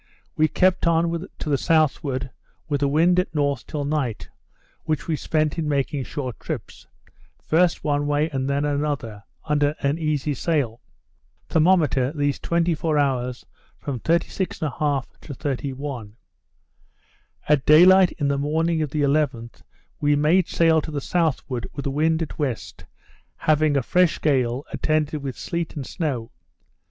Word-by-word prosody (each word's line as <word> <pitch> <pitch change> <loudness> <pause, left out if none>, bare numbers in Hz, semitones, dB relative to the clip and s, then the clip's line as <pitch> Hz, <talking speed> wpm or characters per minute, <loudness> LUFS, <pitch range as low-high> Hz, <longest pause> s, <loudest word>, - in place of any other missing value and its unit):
We 155 - +3
kept 180 +3 +2
on 170 +2 +1
to - - -5
the 140 - +2
southward 145 -4 +1 0.4
with 145 -3 -1
the 140 - +2
wind 170 +5 +3
at 180 -3 -2
north 140 -5 0
till 145 -2 -3
night, 140 -7 -2 0.6
which 155 -4 -2
we 160 - +1
spent 155 +1 -1
in 155 -2 -1
making 140 -1 -1
short 130 -5 -5
trips, - - -7 0.6
first 170 +2 +2
one 145 -1 0
way 145 +1 +1
and 135 -1 -2
then 140 +1 0
another, 140 -8 -2 0.2
under 150 -1 +1
an 140 +3 0
easy 150 -2 -1
sail; 135 -5 -1 0.7
thermometer 155 -6 +3
these 145 -3 -1
24 165 -2 0
hours 125 -3 -1 0.3
from 135 -4 -5
36 170 - -1
1/2 145 -2 -1 0.2
to 140 - -8
31. 135 -5 -4 1.3
At 150 -3 +3
day 155 +4 +8
light 185 -1 +6
in 145 - -2
the 140 0 0
morning 160 +3 0
of 150 - -1
the 150 +1 -1
11th, 140 -5 0 0.4
we 145 0 +3
made 155 +5 +3
sail 165 -1 +3
to 155 - -7
the 150 -2 -3
southward 140 -6 -1
with 140 - -4
the 140 - -2
wind 160 +3 +1
at 160 - -8
west, 110 - -4 0.5
having 155 -1 +2
a 135 - +1
fresh 180 +5 +2
gale, 130 -3 +1
attended 155 -1 0
with 135 -2 -5
sleet 170 -2 -4
and 140 -4 -4
snow. 135 -10 -3
150 Hz, 150 wpm, -23 LUFS, 140-160 Hz, 1.3 s, day